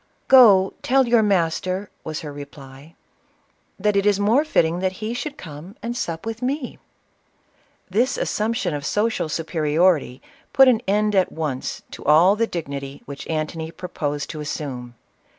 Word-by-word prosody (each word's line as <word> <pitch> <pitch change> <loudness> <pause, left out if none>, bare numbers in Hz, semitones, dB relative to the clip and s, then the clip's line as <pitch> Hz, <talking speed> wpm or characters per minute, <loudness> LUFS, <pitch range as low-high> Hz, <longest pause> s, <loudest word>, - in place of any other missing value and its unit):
"Go, 205 -8 +7
tell 265 0 +3
your 235 -1 +4
master," 185 0 0
was 155 -1 -5
her 150 -2 -7
reply, 140 +1 -12 0.8
"that 210 +1 +1
it 200 +1 +2
is 205 -1 +3
more 225 +8 +3
fitting 170 - +1
he 190 +4 -2
should 280 +4 -5
come 165 +5 -10
and 235 +1 -3
sup 165 -7 -4
with 225 +1 -5
me 260 +1 -3 0.5
!" - - -39
This 240 +7 +1
assumption 220 -4 -1
of 145 -1 -4
social 210 0 0
superiority 155 -3 +1 0.3
put 270 -1 +7
an 240 -3 +4
end 210 +1 +2
at 190 -2 +2
once 150 -5 -4
to - - -9
all 165 +7 +5
the 230 +1 0
dignity 140 -6 -6
which 140 -1 -8
Antony 160 0 -3
purposed 150 -5 -4
to 155 - -7
as 150 - -5
sume. 125 -5 -6
180 Hz, 155 wpm, -22 LUFS, 150-215 Hz, 0.8 s, Go